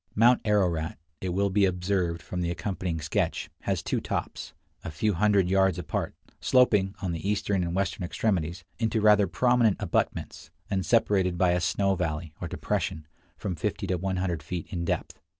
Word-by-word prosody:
Mount 120 +3 +5
Ararat, 90 -7 +1 0.2
it 95 - -2
will 100 +2 +1
be 100 +1 +3
observed 90 -2 -1
from 90 +2 -4
the 85 - -1
accompanying 90 -2 -3
sketch, 75 - -1
has - - -2
two - - -1
tops, - - -4 0.3
a - - -4
few 100 +7 0
hundred 100 0 +3
yards 95 0 +3
apart, 90 -5 -3 0.2
sloping, 105 -6 +3
on 90 - -1
the 85 +4 -3
eastern 100 -2 0
and 85 0 -2
western 100 +2 -1
extremities, 90 -2 -1 0.2
into 110 -1 +1
rather 105 -2 +5
prominent 120 +4 +3
abutments, - - -2 0.2
and 95 -3 0
separated 95 -6 +2
by 90 0 +3
a 90 0 +1
snow 100 +2 +1
valley, 80 -3 -3
or - - -3
depression, 80 -1 -2 0.3
from 95 -4 -3
50 100 +5 -2
to 90 -1 0
100 90 -3 -1
feet 85 +3 -5
in 85 -2 -2
depth. - - -3
95 Hz, 170 wpm, -27 LUFS, 85-100 Hz, 0.3 s, Mount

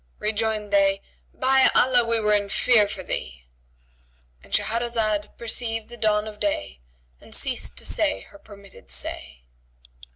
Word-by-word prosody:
Rejoined 215 -1 -1
they, 195 0 +3 0.3
"By 265 +1 +4
Allah, 250 -1 +4
we 230 0 0
were 210 -1 +2
in 205 -1 +1
fear 215 0 +4
for 200 -2 -7
thee".—And - - -11
Shahrazad 220 -3 -1
perceived 225 -1 -2
the 240 - -9
dawn 215 -1 +1
of 210 -1 -10
day 100 - -2 0.4
and - - -6
ceased - - 0
to - - -2
say 95 - 0
her 200 - -16
permitted 200 - -16
say. 60 -1 -3
205 Hz, 135 wpm, -24 LUFS, -, 0.4 s, By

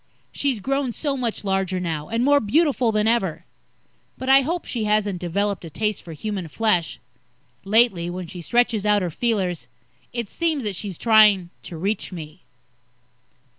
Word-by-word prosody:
She's 275 -6 -1
grown 270 +2 -1
so 285 +1 -2
much 240 -5 -2
larger 190 -2 0
now, 160 -4 -4
and 230 +2 0
more 285 0 +5
beautiful 260 0 +2
than 215 0 +1
ever. 195 -8 0 0.7
But 260 - -4
I 270 +1 +7
hope 335 +6 -3
she 230 -4 -3
hasn't 210 -3 +1
developed 200 +3 -1
a 165 - -7
taste 210 +6 -2
for 165 - -9
human 190 +2 -4
flesh. 180 -1 +1 0.7
Lately, 195 -5 +3
when 180 +1 -5
she 175 +1 -9
stretches 235 +2 +1
out 210 -2 +3
her 175 - -2
feelers, 190 -4 -1 0.4
it 235 -3 -3
seems 315 +1 -1
that 205 -3 -2
she's 190 -2 -5
trying 210 -6 +5
to 170 - -8
reach 200 +5 -2
me. 160 -1 -9
210 Hz, 165 wpm, -23 LUFS, 180-240 Hz, 0.7 s, I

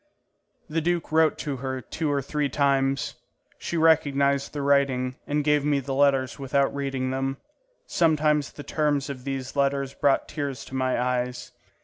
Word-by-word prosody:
The 165 0 -1
duke 175 0 -1
wrote 160 0 +3
to 140 -3 -2
her 130 0 -3
two 150 +4 -3
or 140 -1 0
three 145 +1 -1
times. 135 -1 +1 0.5
She 170 - -3
recognised 140 -3 +3
the 145 -2 -4
writing 135 -2 +2
and 145 0 0
gave 150 -1 +3
me 145 -1 +2
the 135 0 -4
letters 135 -1 +2
without 140 0 +1
reading 135 -2 -2
them. 135 0 -2 0.5
Sometimes 150 - +2
the 145 - -9
terms 145 -2 0
of 130 -1 -9
these 135 -1 -4
letters 140 -1 0
brought 140 -1 +2
tears 140 -5 -4
to - - -13
my 130 -2 0
eyes. 125 0 -2
140 Hz, 160 wpm, -25 LUFS, 135-150 Hz, 0.5 s, wrote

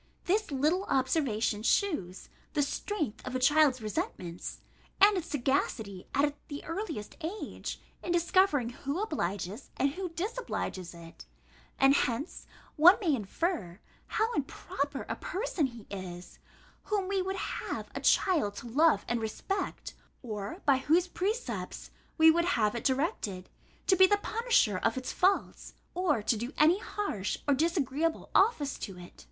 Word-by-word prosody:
This 415 +4 +1
little 305 +8 +1
observation 255 -6 +1
shews 230 - 0 0.3
the 290 - +2
strength 295 - -3
of 255 - -5
a - - +1
child's 275 -2 +4
resentments, 180 -4 -4 0.4
and 405 +1 +7
its 355 -3 -2
sagacity, 240 -8 -1
at 285 +1 +2
the 290 -1 -7
earliest 330 - -5
age, 370 +7 -5 0.2
in 350 - -3
discovering 345 -6 +3
who 280 +6 -4
obliges, 205 - -3
and 275 - +2
who 370 +4 -4
disobliges 335 - -4
it: 165 - -12 0.5
and 270 0 +6
hence 275 +3 -1 0.3
one 345 +6 +8
may 345 -8 +1
infer, 215 - -2 0.3
how 450 +2 0
improper 280 0 -3
a - - -2
person 370 - -1
he 235 -4 -12
is, 180 -2 -8 0.5
whom 405 -3 0
we 390 -1 +1
would 380 +1 -2
have - - -4
a - - -4
child 305 - +3
to 240 - -7
love 305 +7 +3
and 240 -1 0
respect, 380 - -3 0.3
or 210 -4 -5
by 275 -2 +5
whose 325 +7 +2
precepts 415 +7 -3 0.3
we 320 0 +8
would 340 +1 +2
have 210 -2 +2
it 235 - -4
directed, 260 - -1 0.4
to 380 - +5
be 375 +1 +7
the 410 - +3
punisher 435 - +2
of 225 +5 0
its 255 - -4
faults, 385 +2 0 0.2
or 310 - +1
to 230 - +2
do 240 +6 -5
any 330 +6 +5
harsh 400 - -3
or 285 - +5
disagreeable 315 +1 0
office 385 - +3
to 195 -3 -6
it. 175 0 -11
290 Hz, 145 wpm, -30 LUFS, 225-365 Hz, 0.5 s, one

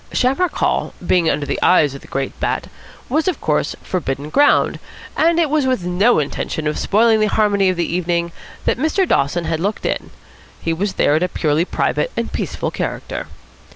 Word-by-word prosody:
Shamrock 285 +7 +1
Hall, - - 0
being 175 -2 +3
under 150 - 0
the - - -3
eyes 150 -6 +4
of 140 - -9
the - - -15
great 135 0 -3
Bat, - - -2 0.4
was, 310 +7 0
of 365 - 0
course, - - 0
forbidden 145 -4 -3
ground; 290 - +3 0.4
and 335 +1 +3
it 330 - +3
was 295 -2 +1
with 255 -8 0
no 190 +7 +3
intention 155 +1 -2
of 150 - -1
spoiling 220 +2 +3
the 215 - +3
harmony 200 -2 +2
of 185 - -1
the 170 - +1
evening 170 -1 -1 0.3
that - - +1
Mr. 320 +6 +1
Dawson 165 - +1
had 160 -1 -1
looked 200 +5 -2
in. - - -2 0.5
He 165 - -1
was 190 +4 -2
there 145 - +2
in 155 - +1
a 180 - +2
purely 155 0 +1
private - - -1
and - - -2
peaceful - - -3
character. - - -4
185 Hz, 190 wpm, -19 LUFS, 160-255 Hz, 0.5 s, eyes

